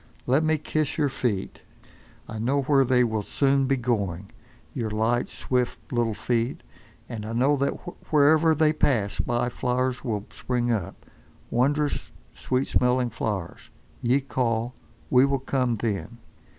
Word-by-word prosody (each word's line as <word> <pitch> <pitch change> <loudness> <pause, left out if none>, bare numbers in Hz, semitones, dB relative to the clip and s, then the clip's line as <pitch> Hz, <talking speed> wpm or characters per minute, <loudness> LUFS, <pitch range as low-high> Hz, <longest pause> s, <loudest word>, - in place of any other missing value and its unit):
Let 135 +5 +3
me 155 0 +2
kiss 155 -1 -2
your 145 -3 +2
feet. 110 -7 -2 0.7
I 110 - -6
know 135 +5 +1
where 135 0 +4
they 125 -1 +3
will 110 -3 0
soon 135 +5 +1
be 135 0 +2
going, 100 -6 -2 0.4
your 115 -5 -2
light, 110 +3 +1
swift 125 -2 -1 0.2
little 115 -3 +1
feet. 115 +3 -1 0.4
And 110 -3 -6
I 110 +1 -5
know 130 +5 +3
that 140 +1 +1 0.4
wherever 155 +2 +5
they 155 0 +3
pass 115 -10 +1
by 120 -1 0
flowers 125 +1 -1
will 110 -5 -2
spring 120 -1 -1
up—wondrous, 130 - -2 0.2
sweet 130 +1 -1
smelling 125 -1 +1
flowers. 100 -6 -4 0.3
Ye 125 +4 +2
call. 120 -3 -1 0.4
We 125 0 +6
will 140 0 +2
come, 130 -2 0
then. 110 +1 -3
125 Hz, 140 wpm, -25 LUFS, 115-135 Hz, 0.7 s, We